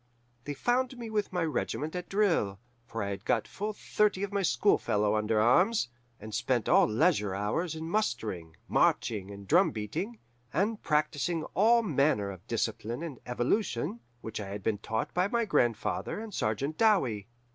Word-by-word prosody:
They 145 - -4
found 250 - 0
me 230 -2 -6
with 210 -1 -1
my 180 -2 0
regiment 155 +1 -2
at 180 0 -5
drill; 170 - +1 0.3
for 115 -2 -3
I 100 - -2
had 100 0 -5
got 115 -2 +1
full 210 +2 -3
thirty 210 -1 +1
of 200 0 -3
my 200 - +1
school 200 +2 +3
fellows 105 0 +1
under 105 0 +1
arms, 175 - +4 0.3
and 110 +1 -9
spent 120 -3 0
all - - +5
leisure 110 - +2
hours 155 - -1
in 160 0 -5
mustering, 105 - -2
marching, 100 -4 +1
and 100 -1 -10
drum 180 +5 +5
beating, 115 - -4 0.3
and 205 +8 0
practising 155 +2 0
all 230 +5 +5
manner 140 - +1
of 95 +3 -12
discipline 115 +3 -2
and 150 -7 -6
evolution 120 - 0 0.2
which 110 0 -5
I 100 - -5
had 100 0 -6
been 105 -1 0
taught 110 +1 -3
by 180 +2 +2
my 235 +2 0
grandfather 120 - 0
and 220 -1 -7
Sergeant 135 +7 -1
Dowie. 130 - +3
145 Hz, 170 wpm, -30 LUFS, -, 0.3 s, all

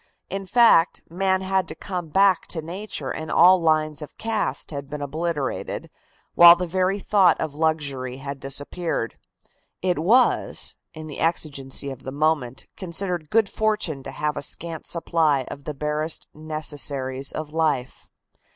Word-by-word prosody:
In 195 0 -4
fact, 230 -7 +5
man 190 +1 +1
had 190 -1 0
come 180 -4 -4
back 190 +2 +3
to 160 -3 -4
nature 190 +6 -5
and 160 0 -5
all 180 +1 +6
lines 155 -1 +2
of 150 - -10
caste 215 -12 -2
had 140 -2 -6
been 150 - -5
obliterated, 150 0 -3 0.4
while 170 0 +10
the 180 +1 -3
very 185 +3 0
thought 200 -2 +3
of 150 - -3
luxury 145 -5 -1
had 140 0 -6
disappeared. 140 -1 -3 0.6
It 180 -3 +1
was, 230 +10 +2 0.2
in 155 0 -7
the 150 -3 -6
exigency 140 -4 -1
of 135 -1 -9
the 130 - -6
moment, 145 -3 0
considered 175 -3 -3
good 225 -1 +3
fortune 210 -10 -1
to - - -8
have 150 0 -2
a - - -2
scant 165 +3 -5
supply 160 -5 +1
of 140 - -9
the 150 - -4
barest 150 +2 -2
necessaries 145 -4 -2
of 155 -1 -6
life. 155 -6 -1
160 Hz, 150 wpm, -24 LUFS, 145-180 Hz, 0.6 s, while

